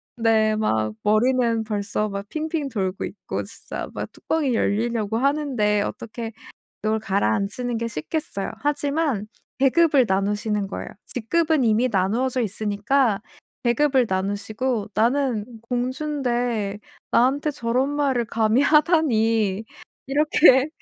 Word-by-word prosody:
네. 220 -2 +3
막 110 - 0
머리는 230 +1 +2
벌써 210 0 -2
막 200 0 -5
핑핑 310 -2 -2
돌고 195 -5 -2
있고 - - -5
진짜 - - -7
막 - - -5
뚜껑이 290 -6 -1
열리려고 225 0 0
하는데 260 -6 +1
어떻게 230 +2 -5 0.5
열 215 +1 +1
가라앉히는 210 - -1
게 230 0 -2
쉽겠어요. 205 - -4
하지만 290 -5 0 0.3
계급을 275 0 +4
나누시는 205 +1 0
거예요. 195 - -6 0.2
직급은 310 +5 +1
이미 230 +2 +3
나누어져 235 +6 0
있으니까 215 +2 0 0.4
계급을 260 +1 +3
나누시고 205 +4 -2
"나는 235 +1 +1 0.2
공주인데 245 -4 -2 0.3
나한테 280 +5 +2
저런 250 +2 0
말을 280 -4 +1
감히 225 +1 +2
하다니." 230 - +3 0.4
이렇게. 285 -1 +5
230 Hz, 275 characters per minute, -23 LUFS, 210-270 Hz, 0.5 s, 이렇게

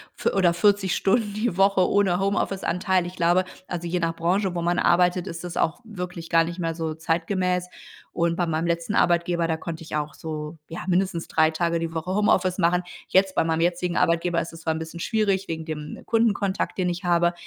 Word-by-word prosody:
fü - - 0
oder 180 -3 +3
40 195 +1 +2
Stunden 205 +1 +1
die 210 -3 -1
Woche, 195 -1 +4
ohne 195 -3 +2
Homeoffice-Anteil. 190 -2 0
Ich 180 +1 -7
glaube, 175 +2 +3 0.2
also, 175 -1 -4
je 180 +1 0
nach 165 -1 -1
Branche, 180 +3 0
wo 170 - -1
man 175 +1 +1
arbeitet, 180 +1 +3
ist 170 +1 -6
das 175 -1 -6
auch 160 - 0
wirklich 180 -6 -7
gar 165 -1 +4
nicht 170 +2 -6
mehr 165 -2 -2
so 160 -1 -3
zeitgemäß. 180 +3 -1 0.5
Und 170 -1 +1
bei 175 - 0
meinem 165 0 -1
letzten 170 +4 -1
Arbeitgeber, 170 -2 +2
da 160 -1 0
konnte 165 0 -6
ich 160 - -6
auch 150 0 -2
so 155 0 -6
ja 165 - -6
mindestens 180 -2 0
3 160 0 +3
Tage 170 +1 0
die 165 0 -4
Woche 165 +3 -2
Homeoffice 190 -2 +2
machen. 180 +1 +2 0.2
Jetzt, 190 0 +3
bei - - +2
meinem 160 0 0
jetzigen 175 0 0
Arbeitgeber, 170 +1 +2
ist 165 +1 -5
es 165 - -11
zwar 160 0 0
'n - - -3
bisschen 160 +1 -7
schwierig 200 -1 0
wegen 160 -1 -4
dem 150 -2 -6
Kundenkontakt, 215 -4 0
den 180 -2 +1
ich 175 +2 -4
habe. 175 0 +3
175 Hz, 210 wpm, -24 LUFS, 165-185 Hz, 0.5 s, Woche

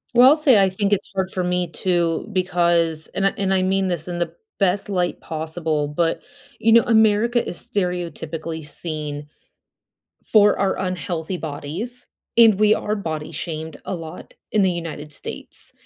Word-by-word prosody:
Well, 250 +2 +9
I'll 295 - +6
say, 270 -9 +5
I 195 - +4
think 200 +2 -1
it's 200 -1 0
hard 190 -1 -1
for 185 - -2
me 180 0 0
too, 170 0 0
because 170 -3 +1
and 195 - +2
I - - +4
and 195 -1 +1
I 190 - +3
mean 190 +1 +1
this 170 -2 -3
in 175 -1 -4
the 175 - -2 0.3
best 195 +1 +1
light 180 -3 -1
possible, 160 -1 -2
but, 165 +3 0 0.4
you 225 - +3
know, 230 - +8
America 220 +1 +3
is 175 - -6
stereotypically 165 -4 -3
seen 150 -1 -4 1.0
for 210 -1 +5
our 195 -1 +1
unhealthy 180 -1 -3
bodies, 170 +11 -5 0.3
and 225 -4 +7
we 215 0 +5
are 210 0 -2
body 160 -6 -4
shamed 160 -2 -5
a - - -3
lot 165 -2 -9 0.2
in 215 - +3
the 190 -1 +3
United 160 -3 -6
States. - - -8
180 Hz, 165 wpm, -22 LUFS, 160-200 Hz, 1.0 s, Well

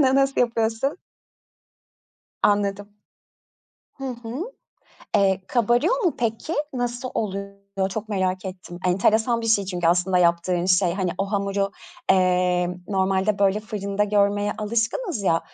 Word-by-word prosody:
Na 265 -2 +4
nasıl 275 0 +2
yapıyorsun? 230 +4 0 1.5
Anladım, 205 0 +1 1.1
hı 270 - -8
hı. 240 +3 -5 0.7
Eee, 195 -1 +3
kabarıyor 245 - +2
mu 345 - +2
peki? 230 +6 -2 0.2
Nasıl 245 0 -3
oluyor? 200 -1 -3
Çok 220 +2 -5
merak 185 -2 -1
ettim. 180 -2 -8
Enteresan 220 +6 +2
bir 230 - -4
şey 220 -3 +3
çünkü 180 -3 -2
aslında 180 +2 +3
yaptığın 170 0 +2
şey. 185 -1 +3
Hani, 185 -3 -1
o 195 +1 -2
hamuru, 200 0 0 0.4
eee, 180 -1 +3 0.2
normalde, 195 +1 +1
böyle, 200 +1 +3
fırında 205 -1 -2
görmeye 205 0 +2
alışkınız 225 - -1
ya; 165 -4 +2
200 Hz, 125 wpm, -24 LUFS, 190-225 Hz, 1.5 s, Na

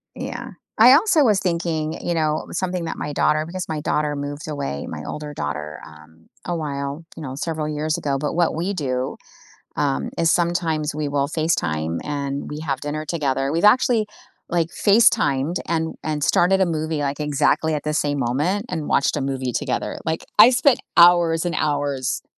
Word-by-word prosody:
Yeah. - - -6 0.3
I 240 +4 +8
also 320 0 +4
was 210 -6 +3
thinking, 170 -3 -2
you 175 - 0
know, 155 -1 0
something 180 -2 -2
that - - -4
my 145 - -4
daughter 155 +1 +2
because 180 +2 -5
my 155 -2 -3
daughter 150 0 0
moved 145 +1 -5
away, 70 - -4
my - - -6
older 150 -1 -6
daughter, 75 - -5
um, 80 +1 -17 0.2
a 175 - -2
while, 140 -1 -4
you - - -7
know, 130 -2 -6
several 155 +1 -3
years 155 +1 -1
ago, 140 -2 -1
but 145 +2 -2
what 170 -1 +1
we 175 +5 -2
do, 130 -6 -2 0.6
um, 70 +1 -1
is 165 0 +3
sometimes 170 -4 0
we 150 -1 -2
will 140 -1 0
FaceTime 85 - -1
and 140 -1 -4
we 150 - -6
have 140 -4 -3
dinner 150 +1 -4
together. 140 -4 -1
We've 165 +4 -1
actually, 230 0 +4 0.4
like, 170 -1 0
FaceTimed 170 - +3
and 160 -1 -1
and 150 -2 -2
started 190 +5 +3
a - - +5
movie, 160 -2 -2
like, 140 0 -2
exactly 150 +1 +1
at 150 - -4
the 150 - -2
same 145 -1 0
moment, 150 - 0
and 155 -2 -3
watched 140 - +2
a - - -1
movie 135 -2 -2
together. - - -2
Like, 160 0 -2
I 220 +3 +10
spent 255 +1 +3 0.2
hours 170 -1 +6
and 175 - -1
hours 145 -3 -1
155 Hz, 180 wpm, -22 LUFS, 140-170 Hz, 0.6 s, I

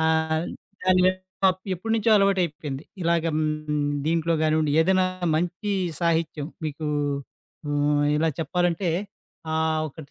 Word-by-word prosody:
ఆహ్, 160 0 +1 0.4
దాని 185 0 +4 0.4
పప్ 185 -1 +4
ఎప్పటినుంచో 225 +4 0
అలవాటు 195 -1 +3
అయిపేంది. 150 -3 -5 0.2
ఇలాగ 170 -1 +2
హ్మ్, 155 -1 -1 0.2
దీంట్లో 165 +1 +1
కానివ్వండి. 155 -1 +2
ఏదైనా 185 +2 +3 0.3
మంచి 180 +5 -2 0.3
సాహిత్యం 165 -3 0 0.2
మీకు 155 +1 -4 0.8
ఆహ్, 145 0 +2
ఇలా 160 +2 +2
చెప్పాలంటే 175 +2 0 0.6
ఆహ్, 160 0 +1
ఒకటి 145 0 -12
160 Hz, 115 wpm, -25 LUFS, 155-180 Hz, 0.8 s, దాని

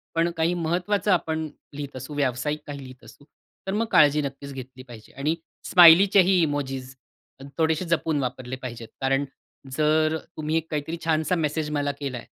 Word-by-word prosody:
पण 165 +1 +2
काही 165 +2 +2
महत्त्वाचं 180 +4 0
आपण 160 -3 0 0.3
लिहीत 145 -1 -7
असू, 130 +4 -8
व्यावसायिक 145 +2 -1
काही 145 -1 -6
लिहीत 130 +1 -13
असू, 145 - -16 0.4
तर 190 - -1
मग 220 +2 +1
काळजी 150 0 +5
नक्कीच 140 0 -6
घेतली 130 -1 -9
पाहिजे. 120 -4 -14
आणि 145 +4 -1 0.3
स्माइलीचेही 185 +2 +7
इमोजीस 135 -4 -2 0.6
थोडेसे 160 +2 +1
जपून 160 -2 +1
वापरले 130 0 -4
पाहिजेत, 120 -3 -7
कारण 135 +1 +1 0.5
जर 155 +1 +2 0.2
तुम्ही 155 +1 -1
एक 165 0 -3
काहीतरी 155 +2 -3
छानसा 160 +2 +1
मेसेज 155 -1 -1
मला 145 0 0
केलाय 130 -5 -5
150 Hz, 155 wpm, -25 LUFS, 135-165 Hz, 0.6 s, स्माइलीचेही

